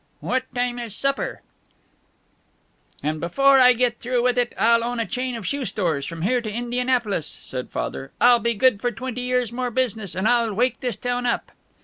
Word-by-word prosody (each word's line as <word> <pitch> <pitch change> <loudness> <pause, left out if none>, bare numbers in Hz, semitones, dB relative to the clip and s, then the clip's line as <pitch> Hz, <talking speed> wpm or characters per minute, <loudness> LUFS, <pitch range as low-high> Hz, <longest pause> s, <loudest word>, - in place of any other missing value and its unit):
"What 255 +1 -1
time 245 0 -1
is 230 -4 -4
supper?" 275 +3 -2 0.8
"... - - -33
and 155 +1 -1
before 270 - +4
I 250 -1 +7
get 240 -1 0
through 245 0 0
with 250 -1 +2
it 245 -1 +1
I'll 230 +1 +4
own 240 0 -2
a 230 - 0
chain 250 +5 -3
of 225 -4 -6
shoe 280 +5 -2
stores 165 - -1
from 165 -1 -6
here 245 +5 +2
to 215 -2 -5
Indianapolis," 240 - -1
said 125 -1 -6
Father. 135 - -4
"I'll 245 -1 +6
be 235 0 0
good 225 -2 +3
for 245 - 0
twenty 250 -1 -5
years' 250 -2 0
more 250 +1 -2
business, 220 -7 -1
and 190 +4 0
I'll 235 -3 +2
wake 245 +3 +1
this 245 -5 -3
town 245 0 -2
up." - - -1
240 Hz, 200 wpm, -23 LUFS, 215-250 Hz, 0.8 s, I